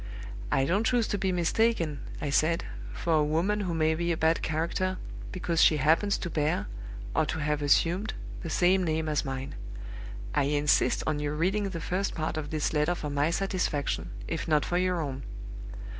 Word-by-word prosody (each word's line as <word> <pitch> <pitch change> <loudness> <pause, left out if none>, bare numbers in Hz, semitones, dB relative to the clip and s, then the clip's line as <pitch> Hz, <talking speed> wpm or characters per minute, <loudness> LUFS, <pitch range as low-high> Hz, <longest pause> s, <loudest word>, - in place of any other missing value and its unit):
'I 135 - +3
don't 190 +9 +2
choose 235 -1 +2
to 205 - 0
be 190 0 +1
mistaken,' 175 -3 +1 0.2
I 145 - -2
said, 160 +4 +2 0.3
'for 170 - -1
a - - +4
woman 170 +8 +1
who 180 -5 -1
may 160 0 +3
be 170 +2 0
a 165 - 0
bad 160 +1 +2
character, 170 +4 -1 0.3
because 170 -3 0
she 155 - +6
happens 160 +8 +3
to 175 - -4
bear, 160 +7 +1 0.5
or 155 - +3
to - - -2
have 150 -1 0
assumed, 170 +8 +2 0.3
the 165 - -5
same 185 +3 +3
name 160 -1 0
as 150 -1 +1
mine. 135 -1 -4 0.8
I 145 - +3
insist 145 0 +3
on 155 -1 0
your 150 0 -2
reading 195 +5 +1
the 175 -3 -4
first 185 +4 -1
part 155 0 -2
of 155 -1 -3
this 155 0 -1
letter 150 +3 +2
for 150 -3 -4
my 145 +2 +2
satisfaction, 180 -5 -1 0.2
if 165 0 -3
not 150 -2 +3
for 175 - +1
your 180 -2 +1
own. 135 -3 -4
160 Hz, 190 wpm, -29 LUFS, 150-185 Hz, 0.8 s, she